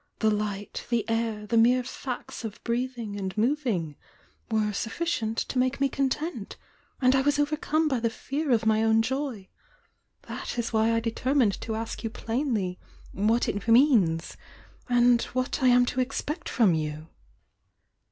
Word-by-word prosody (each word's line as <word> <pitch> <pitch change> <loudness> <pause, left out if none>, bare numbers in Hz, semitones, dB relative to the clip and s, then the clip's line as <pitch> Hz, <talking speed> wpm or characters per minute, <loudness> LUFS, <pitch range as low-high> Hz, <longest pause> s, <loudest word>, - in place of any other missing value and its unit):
— - - -50
the 220 -1 +2
light, 205 -1 -3
the 230 -3 0
air, 225 -2 -1
the 230 - -1
mere 245 +3 +5
facts 255 -1 -6
of 215 -2 -6
breathing 235 -3 -3
and 190 +1 -4
moving 220 - 0 0.5
were 215 -2 +1
suflBcient 225 0 -2
to 255 - -2
make 255 +1 +1
me 275 - +3
content! 270 - -2 0.2
— - - -35
and 255 +1 +5
I 265 - +4
was 290 +1 +2
overcome 305 +2 +1
by 265 -5 0
the 230 0 +1
fear 280 +6 -4
of 230 -3 +2
my 220 0 +3
own 225 0 +3
joy! 265 -5 -3 0.8
That - - -6
is 235 -1 -2
why 220 +1 +3
I 230 0 +1
determined 235 -1 +1
to 220 - -3
ask 225 +2 -5
you 225 - -1
plainly 225 -6 -2 0.3
what 220 +5 +1
it 205 +2 -3
means, 230 - +4 0.5
and 245 -1 +4 0.2
what 255 +1 -1
I 260 - +4
am 245 0 +6
to 250 - -3
expect 295 +5 -3
from 215 -8 +3
you!" 155 0 -3
230 Hz, 165 wpm, -27 LUFS, 215-260 Hz, 0.8 s, am